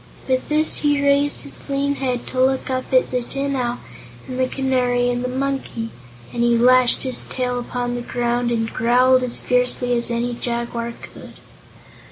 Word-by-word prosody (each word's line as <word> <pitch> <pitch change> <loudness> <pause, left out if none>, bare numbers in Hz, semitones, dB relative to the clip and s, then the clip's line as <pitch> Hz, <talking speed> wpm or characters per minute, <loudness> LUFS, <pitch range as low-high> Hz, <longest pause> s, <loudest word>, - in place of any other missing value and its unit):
With 260 -1 -1
this 305 +1 +4
he 290 -1 +1
raised 285 +1 +3
his - - -7
lean 280 +1 0
head 250 -3 -2
to 255 - -1
look 265 0 +1
up 255 0 -3
at 255 -1 +3
the 250 -1 0
Tin 275 +3 -3
Owl 245 -1 -2 0.5
and 255 0 -5
the 255 - +2
Canary 250 -2 0
and 245 0 -2
the - - -1
Monkey, 265 -3 -3 0.4
and 235 - -2
he 235 0 +3
lashed 250 +1 +4
his 260 -2 +1
tail 250 -1 -2
upon 245 0 -4
the 245 - -3
ground 240 0 -1
and 225 -1 -1
growled 250 +3 +3
as 250 -1 0
fiercely 250 0 +1
as 235 0 +3
any 240 +1 -1
jaguar 235 -1 -4
could. - - -12
250 Hz, 180 wpm, -20 LUFS, 240-260 Hz, 0.5 s, this